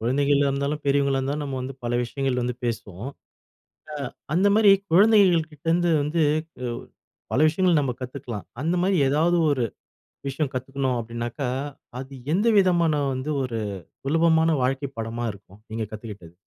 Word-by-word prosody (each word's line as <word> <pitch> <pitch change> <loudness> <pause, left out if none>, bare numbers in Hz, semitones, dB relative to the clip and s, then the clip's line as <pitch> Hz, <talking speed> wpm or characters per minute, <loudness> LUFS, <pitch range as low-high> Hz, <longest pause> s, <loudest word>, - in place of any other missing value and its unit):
குழந்தைகளா 140 +4 +2
இருந்தாலும், 140 +2 -1
பெரியவங்களா 140 -1 +2
இருந்தாலும் 140 +3 -2
நம்ம 135 -2 -4
வந்து 130 +1 -5
பல 120 - -1
விஷயங்கள் 130 +1 -1
வந்து 125 0 -2
பேசுவோம். 110 -1 -4 0.8
அ - - -5 0.4
அந்த 190 +5 +4
மாரி 215 -2 +7 0.2
குழந்தைகள் 185 -4 +5
கிட்ட 150 0 -18
இருந்து 175 0 +2
வந்து 155 +3 0 1.1
பல - - +2
விஷயங்கள் 170 0 +3
நம்ம 130 -3 -1
கத்துக்கலாம். 125 -4 -6 0.2
அந்த 165 +4 +1
மாரி 190 0 +2
ஏதாவது 160 +5 +2
ஒரு 130 -4 +1 0.6
விஷயம் 135 +1 -2
கத்துக்கணும் 130 0 -1
அப்டினாக்கா, 120 +3 -4 0.5
அது 135 +1 -9 0.2
எந்த 205 +5 +2
விதமான 170 -4 +3 0.2
வந்து 130 +3 -3
ஒரு 120 -3 -3 0.5
சுலபமான 160 +2 +3
வாழ்க்கை 135 +2 -1
பாடமா 115 +1 -3
இருக்கும்? 100 0 -17
நீங்க 110 0 -2
கத்துக்கிட்டது. 105 -6 -9
140 Hz, 140 wpm, -24 LUFS, 125-160 Hz, 1.1 s, மாரி